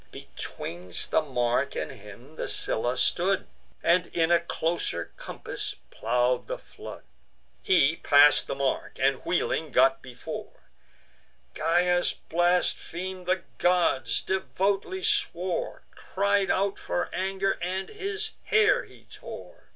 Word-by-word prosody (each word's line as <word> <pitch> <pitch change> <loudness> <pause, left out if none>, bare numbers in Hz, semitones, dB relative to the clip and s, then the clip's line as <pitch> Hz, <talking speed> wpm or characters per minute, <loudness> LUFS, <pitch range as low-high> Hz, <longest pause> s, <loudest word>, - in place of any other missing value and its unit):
Betwixt 90 +1 -5
the - - +4
mark 125 -2 0
and - - -3
him 120 +5 -13
the - - -3
Scylla 120 +3 -1
stood, 185 +8 +2 0.4
And 175 +1 +4
in 165 0 +1
a 170 - +6
closer 170 0 -2
compass - - -6 0.2
plow'd 125 0 +1
the - - -3
flood. - - -11 0.6
He 165 -4 +4
pass'd 145 +1 +6
the - - -2
mark; 135 -1 -1
and, 135 0 +3
wheeling, 160 -3 0
got 135 +2 +4
before: 125 -2 -8 0.9
Gyas 175 +1 +2
blasphem'd 180 +1 0
the 185 -1 +1 0.2
gods, 135 -11 +2
devoutly 195 - -1
swore, 190 - -1
Cried 200 0 0
out 195 +1 +1
for 175 - -2
anger, 195 +1 0
and 185 +2 -2
his 420 +1 -4
hair 430 +3 +4
he - - -18
tore. - - -11
175 Hz, 120 wpm, -27 LUFS, 135-190 Hz, 0.9 s, a